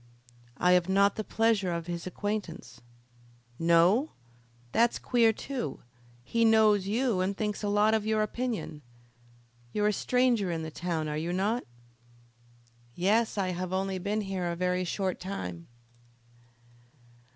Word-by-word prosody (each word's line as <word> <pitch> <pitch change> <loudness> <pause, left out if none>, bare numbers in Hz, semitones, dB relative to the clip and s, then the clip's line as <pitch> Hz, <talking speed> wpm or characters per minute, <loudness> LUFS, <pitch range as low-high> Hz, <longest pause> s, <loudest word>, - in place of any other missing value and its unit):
"I 180 - +3
have 180 0 +3
not 200 +1 +3
the 215 - -3
pleasure 220 -4 +1
of 170 -1 -3
his 170 0 -5
acquaintance." 185 - -5 0.8
"No? 170 - +3 0.6
that's 235 +1 +3
queer 235 -2 +3
too. 240 - -5 0.4
He 230 - 0
knows 215 -3 +4
you 230 -1 +1
and 195 +2 -1
thinks 210 -2 -2
a 205 - -1
lot 210 +2 +3
of 220 -1 +1
your 215 0 +1
opinion. 220 -9 -4 0.9
You're 210 0 +2
a - - 0
stranger 245 -3 +1
in 165 -2 -2
the 160 - -6
town, 165 -2 -3
are 150 0 -3
you 165 +2 -3
not?" 205 +7 0 1.3
"Yes, 215 +5 +1
I 190 -2 0
have 180 0 -4
only 190 0 -1
been 205 +3 -1
here 190 -3 -3
a - - -3
very 180 +1 0
short 190 +1 -2
time." 90 - -6
195 Hz, 140 wpm, -29 LUFS, 175-220 Hz, 1.3 s, knows